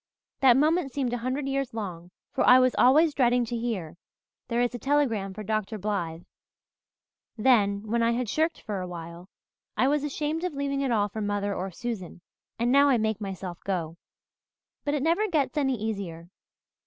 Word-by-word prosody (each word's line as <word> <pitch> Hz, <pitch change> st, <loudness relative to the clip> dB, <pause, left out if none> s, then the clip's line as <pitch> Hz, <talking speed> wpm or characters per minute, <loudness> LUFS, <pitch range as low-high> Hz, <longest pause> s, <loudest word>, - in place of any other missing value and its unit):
That 260 Hz, -2 st, +6 dB
moment 310 Hz, 0 st, +2 dB
seemed 255 Hz, -3 st, -2 dB
a 245 Hz, -, -1 dB
hundred 260 Hz, +4 st, -2 dB
years 275 Hz, -3 st, -2 dB
long, 180 Hz, -5 st, -5 dB, 0.2 s
for 265 Hz, -, +1 dB
I 250 Hz, -, +8 dB
was 255 Hz, -1 st, +4 dB
always 300 Hz, +5 st, +5 dB
dreading 245 Hz, -2 st, +3 dB
to 235 Hz, -, -4 dB
hear 220 Hz, -9 st, -3 dB, 0.5 s
'There 235 Hz, 0 st, 0 dB
is 245 Hz, 0 st, 0 dB
a 245 Hz, -, -5 dB
telegram 245 Hz, -8 st, +1 dB
for 215 Hz, +3 st, -7 dB
Dr. 215 Hz, +1 st, -2 dB
Blythe.' 180 Hz, -5 st, -3 dB, 1.1 s
Then, 210 Hz, -4 st, +3 dB
when 230 Hz, +2 st, -1 dB
I 230 Hz, 0 st, +3 dB
had 245 Hz, 0 st, -1 dB
shirked 315 Hz, +9 st, 0 dB
for 205 Hz, -3 st, -4 dB
a 180 Hz, -, -4 dB
while, 170 Hz, +1 st, -9 dB, 0.5 s
I 260 Hz, -, +3 dB
was 290 Hz, +1 st, +1 dB
ashamed 300 Hz, +3 st, -2 dB
of 360 Hz, -5 st, -2 dB
leaving 280 Hz, 0 st, -1 dB
it 275 Hz, -, 0 dB
all 210 Hz, -3 st, +2 dB
for 215 Hz, +2 st, -6 dB
mother 205 Hz, -1 st, -1 dB
or 190 Hz, 0 st, -3 dB
Susan, 185 Hz, -3 st, -6 dB, 0.4 s
and 235 Hz, +1 st, +1 dB
now 280 Hz, +1 st, +6 dB
I 260 Hz, -, +4 dB
make 220 Hz, -1 st, -1 dB
myself 190 Hz, -3 st, -6 dB
go. 170 Hz, -4 st, -2 dB, 0.9 s
But 290 Hz, 0 st, 0 dB
it 280 Hz, -, -1 dB
never 340 Hz, +7 st, +2 dB
gets 310 Hz, -6 st, 0 dB
any 270 Hz, -3 st, +1 dB
easier. 190 Hz, -6 st, -5 dB
235 Hz, 185 wpm, -27 LUFS, 200-275 Hz, 1.1 s, I